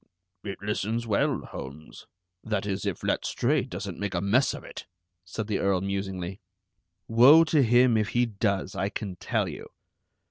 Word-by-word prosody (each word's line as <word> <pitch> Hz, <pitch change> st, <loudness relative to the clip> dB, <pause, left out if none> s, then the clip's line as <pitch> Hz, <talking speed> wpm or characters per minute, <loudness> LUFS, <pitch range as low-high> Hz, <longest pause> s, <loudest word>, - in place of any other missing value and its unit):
"It 100 Hz, -2 st, -5 dB
listens 105 Hz, +3 st, -2 dB
well, 105 Hz, -3 st, +1 dB
Holmes, 75 Hz, +4 st, -10 dB, 0.4 s
that 105 Hz, -3 st, -2 dB
is, 100 Hz, 0 st, -2 dB
if 95 Hz, -, -4 dB
Letstrayed -, -, 0 dB
doesn't -, -, -6 dB
make 100 Hz, -2 st, -3 dB
a -, -, +1 dB
mess 105 Hz, +8 st, +2 dB
of -, -, -10 dB
it," -, -, -10 dB, 0.4 s
said 100 Hz, +4 st, -5 dB
the 105 Hz, -2 st, -1 dB
Earl 100 Hz, -2 st, +1 dB
musingly. 95 Hz, -1 st, -4 dB, 0.7 s
"Woe 130 Hz, +8 st, +7 dB
to 160 Hz, -2 st, +2 dB
him 120 Hz, 0 st, +4 dB
if 110 Hz, -1 st, 0 dB
he 120 Hz, 0 st, +2 dB
does, 100 Hz, -4 st, -1 dB
I 95 Hz, -, -1 dB
can 100 Hz, -3 st, -5 dB
tell -, -, -1 dB
you." -, -, -8 dB
100 Hz, 165 wpm, -27 LUFS, 95-115 Hz, 0.7 s, Woe